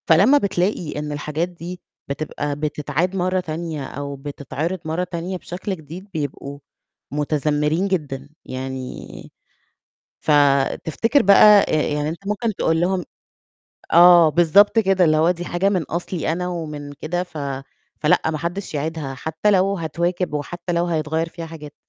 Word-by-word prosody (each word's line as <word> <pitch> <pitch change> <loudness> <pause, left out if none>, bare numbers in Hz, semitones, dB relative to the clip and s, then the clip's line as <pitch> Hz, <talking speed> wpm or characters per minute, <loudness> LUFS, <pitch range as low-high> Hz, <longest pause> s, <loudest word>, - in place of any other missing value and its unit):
فلمّا 200 - +6
بتلاقي 180 - -1
إن 150 0 -4
الحاجات 150 +3 -2
دي 175 +1 -8 0.3
بتبقى 145 0 -3
بتتعاد 150 +4 -2
مَرّة 185 0 +1
تانية 160 -3 -4
أو 140 +1 -6
بتتعرِض 145 +5 -4
مَرّة 160 +3 -1
تانية 180 +1 -4
بشكل 185 +3 -5
جديد 165 +4 -10
بيبقوا 140 -2 -5 0.5
متذمرين 150 +4 0
جدًا، 145 -7 -3 0.2
يعني، 130 0 -7 0.9
فتفتكر 150 - +2
بقى 200 +1 +7
يعني 150 -1 0
أنت 170 +5 -7
ممكن 210 +2 -1
تقول 165 -3 +1
لهم 180 0 0 0.9
آه، 175 -1 +8
بالضبط 175 +7 +5
كده، 190 -3 +4
اللي 155 -2 +4
هو 160 +3 +4
دي 175 -1 -2
حاجة 175 +3 0
من 190 -4 +1
أصلي 170 +1 -3
أنا 180 +2 -2
ومن 150 -5 -5
كده 160 +5 -3
ف 175 -3 -9 0.6
فلأ 150 - +4
ما 155 - -3
حدش 175 +3 -4
يعيدها 150 -2 -3
حتى 160 +9 -1
لو 195 0 +3
هتواكب 170 0 -2
وحتى 170 +4 -4
لو 170 0 +1
هيتغيّر 160 0 -1
فيها 165 0 -8
حاجات، 150 -3 -10
165 Hz, 140 wpm, -21 LUFS, 150-180 Hz, 0.9 s, آه